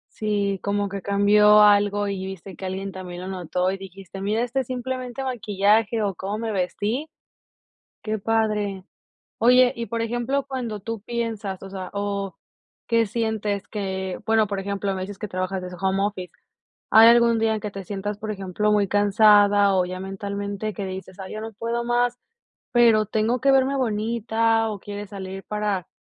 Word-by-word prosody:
Sí, 200 -2 -1
como 200 0 -1
que 200 0 -5
cambió 210 +1 +5
algo, 205 0 +4
y 195 -1 -3
viste 190 0 -8
que 190 - -8
alguien 195 +1 -4
también 180 -2 -7
lo 185 - -6
notó, 180 0 -1
y 195 - -5
dijiste: 195 0 -10
"Mira, 215 +4 0
este 245 +2 -1
es 260 - -3
simplemente 255 0 -4
maquillaje, 215 -2 +1
o 200 -2 0
cómo 195 +4 -4
me 225 -1 -3
vestí". 210 - -2 0.9
Qué 215 0 -2
padre. 210 -3 0 0.6
Oye, 250 +2 +5
y 235 0 -4
por 230 -1 -2
ejemplo, 240 +4 -1
cuando 240 -6 -4
tú 225 +1 -5
piensas 225 -5 -4
o 195 - -8
sea, 190 -1 -6
o 200 -1 -3 0.5
qué 230 -1 +3
sientes 215 -2 -2
que 190 -3 -4
bueno, 220 -1 +3
por 200 -1 -3
ejemplo, 200 0 -2
me 185 - -4
dices 195 +1 -6
que 210 - -4
trabajas 185 0 -3
desde 180 0 -7
home 190 0 +1
office, 200 -3 -3 0.6
¿hay 220 +1 +8
algún 235 -1 +5
día 225 0 +2
en 215 - -3
que 210 -2 -4
te 195 -2 -7
sientas 205 +1 -4
por 215 - -5
ejemplo, 195 +1 -1
muy 205 -2 +2
cansada, 205 -1 +5
o 185 -1 +3
ya 185 +1 -6
mentalmente, 200 +2 -4
que 200 - -5
dices: 190 0 -7
"Ay 190 - -8
ya 215 - -5
no 225 0 -7
puedo 230 +3 -3
más 245 0 +1 0.5
pero 230 -3 +5
tengo 220 +3 0
que 275 - +4
verme 270 0 +3
bonita" 225 -1 +1
o 205 - -5
quieres 205 +1 -7
salir 195 -1 -7
para, 210 -4 -2
205 Hz, 180 wpm, -24 LUFS, 195-225 Hz, 0.9 s, hay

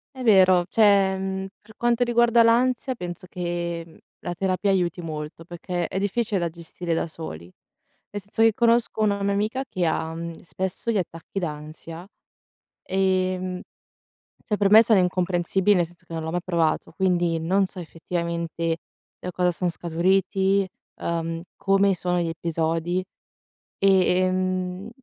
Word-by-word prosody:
È 255 - -6
vero, 185 -5 +5
cioè, 200 -3 +4
mhmm, 190 0 -3
per 220 0 -17
quanto 240 0 +2
riguarda 235 -1 +4
l'ansia 250 +2 +2
penso 180 -3 -7
che 170 -2 -4 0.2
la 175 - -4
terapia 190 +2 0
aiuti 180 -2 +1
molto 155 0 -6
perché 175 0 -4
è 190 - -3
difficile 205 +1 0
da 170 -2 0
gestire 170 +1 -5
da 165 - -1
soli. 155 - -8 0.7
Nel 205 - -5
senso 205 +3 -4
che 225 - +6
conosco 235 0 +2
una 200 -2 +1
mia 200 - +1
amica 215 +6 -1
che 180 -2 -1
ha, 160 0 -1
mhmm, 165 0 -6
spesso 190 +6 -3
gli 220 - +1
attacchi 170 +1 -4
d'ansia, 160 +1 -7 0.8
ehm, 185 -1 0 0.8
cioè 210 - -1
per 200 -1 +3
me 220 +2 +9
sono 220 -4 +4
incomprensibili 180 +2 +1
nel 175 -1 +2
senso 175 +2 -21
che - - -11
non 160 - -3
l'ho 160 - -3
mai 175 0 -1
provato, 170 -3 0
quindi 175 -2 +1
non 190 +5 +2
so 185 - -10
effettivamente 170 0 -3 0.4
da 180 - -5
cosa 180 0 +2
son 175 0 -1
scaturiti, 190 +3 +1 0.3
ehm, 165 0 -3
come 195 0 +3
sono 180 0 -1
gli 170 - -1
episodi 165 +2 -1 0.8
e, 195 - +2 0.3
ehm, 185 +1 -1
185 Hz, 150 wpm, -24 LUFS, 170-195 Hz, 0.8 s, me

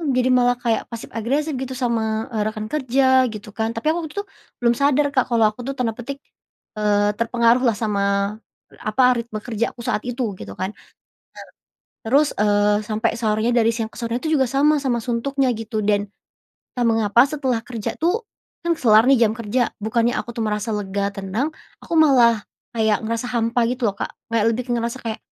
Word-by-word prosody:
jadi 255 0 +2
malah 245 -1 +4
kayak 230 -2 0
pasif 230 -1 -7
agresif 280 +8 -1
gitu 260 0 -4
sama, 225 -3 -1
eee, 215 - 0
rekan 215 0 -4
kerja 260 -2 +3
gitu 210 -1 -9
kan 220 0 -1
tapi 230 +7 0
aku - - -2
waktu 300 - -10
itu, - - -15 0.4
belum 235 0 +4
sadar 285 +1 +3
Kak 260 -3 +3
kalau 230 -2 +4
aku 215 +4 -10
tuh 275 - -2
tanda 230 -3 0
petik, 275 +3 -6 0.6
eee, 205 -1 +2
"terpengaruh" 235 +1 +3
lah 225 - +2
sama, 200 -2 0 0.5
apa 215 +5 +1
ritme 230 -2 -5
kerjaku 235 +1 -3
saat 210 - -1
itu 240 -5 -2
gitu 100 -1 -8
kan, 190 +2 -2 1.3
nah - - -5
terus, 295 +1 +4
eee, 205 0 +3
sampai 220 +2 0
sorenya 220 +1 +1
dari 225 -1 +4
siang 225 -2 -2
ke - - -16
sorenya 235 +1 -2
itu 315 - 0
juga 265 - +4
sama 290 +3 +3
sama 245 -4 0
suntuknya 260 +3 0
gitu 220 -1 -3
dan, 205 0 +1 0.7
entah 245 -2 0
mengapa 225 +1 +4
setelah 270 -5 -1
kerja 230 -4 -4
tuh, 355 +8 +1 0.4
kan 340 0 +2
kelar 220 -4 +5
nih 275 - +6
jam 215 - 0
kerja 230 +2 0
bukannya 230 +2 +1
aku - - -6
tuh 230 - -2
merasa 210 +1 -2
lega, 200 0 -2
tenang, 200 +9 -2 0.3
aku - - -6
malah 240 -8 +5 0.3
kayak 220 -2 +2
ngerasa 230 +2 -2
hampa 235 +1 +1
gitu 245 -2 -1
loh 200 - -6
Kak - - -4 0.2
kayak 225 -2 +2
lebih 240 +2 -2
ngerasa 235 +1 -2
kayak, 225 -2 -4
230 Hz, 185 wpm, -21 LUFS, 215-255 Hz, 1.3 s, nih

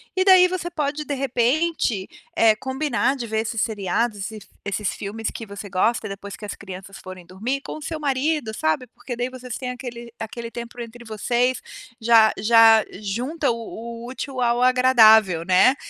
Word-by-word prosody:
e 375 - +3
daí 370 -1 +7
você 355 -1 -3
pode, 300 -2 -3
de 290 - -2
repente, 260 - 0 0.3
eh, 220 -1 +5
combinar 265 0 -1
de 250 -4 -5
ver 220 -1 -1
esses 225 0 -2
seriados, 210 0 -1
e - - -9
esses 195 -3 -14 0.2
esses 200 +1 -2
filmes 215 +2 -4
que 225 - -7
você 200 0 -8
gosta 210 +5 +1
e - - -8
depois 200 0 -7
que 210 - -8
as 205 - -5
crianças 195 0 -10
forem 185 -1 -10
dormir 220 +10 -3
com - - -7
o 310 - -11
seu 315 0 -5
marido, 280 -3 0
sabe, 155 +7 -1
porque 250 +2 -8
daí 245 +1 -2
vocês 255 -1 -7
têm 250 -1 -4
aquele 240 -2 -8
aquele 230 +1 -6
tempo 235 +1 -8
entre 235 0 -8
vocês, 240 +3 0 0.4
já 225 -1 +6
já 225 -1 +6 0.2
junta 250 +10 -2
o - - -2
o 230 0 -8
útil 260 +1 -6
ao 240 0 +2
agradável, 220 -8 +5
né? 185 +9 +5
235 Hz, 185 wpm, -23 LUFS, 215-260 Hz, 0.4 s, daí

